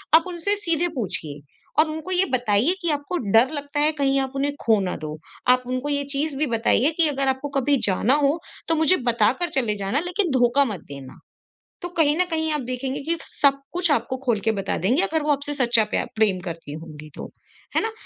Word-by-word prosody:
आप 325 - +6
उनसे 360 +3 -1
सीधे 340 -4 +1
पूछिए 165 - -4 0.4
और 310 0 +4
उनको 315 +3 -6
ये 370 +1 +3
बताइए 245 - +2
कि 340 - -1
आपको 290 +4 -2 0.2
डर 230 +4 +5
लगता 290 0 -4
है 300 +1 +3
कहीं 275 0 +2
आप 265 -1 -3
उन्हें 285 +1 -1
खो 220 -2 +4
ना 185 -2 -3
दो। 155 0 -6 0.4
आप 255 - -9
उनको 255 +3 -3
ये 285 -1 +2
चीज़ 295 +1 +1
भी 305 - +2
बताइए 240 +5 +3
कि 335 -2 +5
अगर 275 -1 -1
आपको 265 +2 -1
कभी 280 +2 +2
जाना 205 +7 +2
हो 285 +4 +2 0.3
तो 325 - +2
मुझे 320 +4 +4
बता 225 -2 +3
कर 350 - 0
चले 220 -5 0
जाना 200 +7 -1
लेकिन 360 -2 -1
धोखा 245 +4 +4
मत 210 -8 -5
देना। 135 -2 -10 0.6
तो 350 - -5
कहीं 300 -2 +3
न 365 - +2
कहीं 320 -1 0
आप 300 - -1
देखेंगे 255 +2 -4
कि 335 +3 0
सब 275 -2 +2
कुछ 350 -1 +1
आपको 260 -1 0
खोल 235 -4 +1
के 225 - +1
बता 195 -2 -3
देंगे 240 - +1
अगर 320 -5 -1
वो 300 - +1
आपसे 285 0 -1
सच्चा 240 -5 +3
प्या - - 0
प्रेम 210 -4 +2
करती 165 -4 -7
होंगी 155 -1 -10
तो - - -8 0.4
है - - +3
ना? 445 - -2
275 Hz, 220 wpm, -23 LUFS, 225-315 Hz, 0.6 s, आप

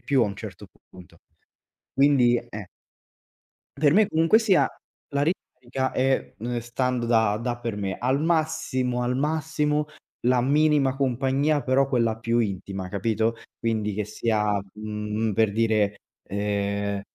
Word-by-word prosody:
più 135 -3 +2
a 110 - +2
un 100 - -4
certo - - -9 0.2
punto. 90 -2 -15 0.8
Quindi 135 -4 +4
eh. 105 -4 -7 1.1
Per 145 -1 +4
me 210 +2 +4
comunque 165 +7 +4
sia, 200 -5 +3 0.4
la 140 - +1
ricarica 130 -5 -3
è, 130 +1 0
uhm, 120 +2 -3
stando 120 +1 -2
da 110 -3 +3
da 120 0 -2
per 115 -3 -4
me, 95 -2 -3
al 130 +3 +1
massimo, 155 -7 0
al 125 +1 0
massimo 150 0 0 0.4
la 125 0 +3
minima 140 0 +2
compagnia 135 +3 +1
però 135 +1 +2
quella 115 -4 +1
più 115 +1 0
intima, 95 -2 -3
capito, 110 +3 0 0.2
quindi 110 -3 -1
che 105 +1 -2
sia, 105 -1 0
mhmm, 105 0 -3
per 110 -1 +2
dire, 110 -2 +2 0.3
ehm, 100 0 -2
120 Hz, 135 wpm, -25 LUFS, 105-140 Hz, 1.1 s, Quindi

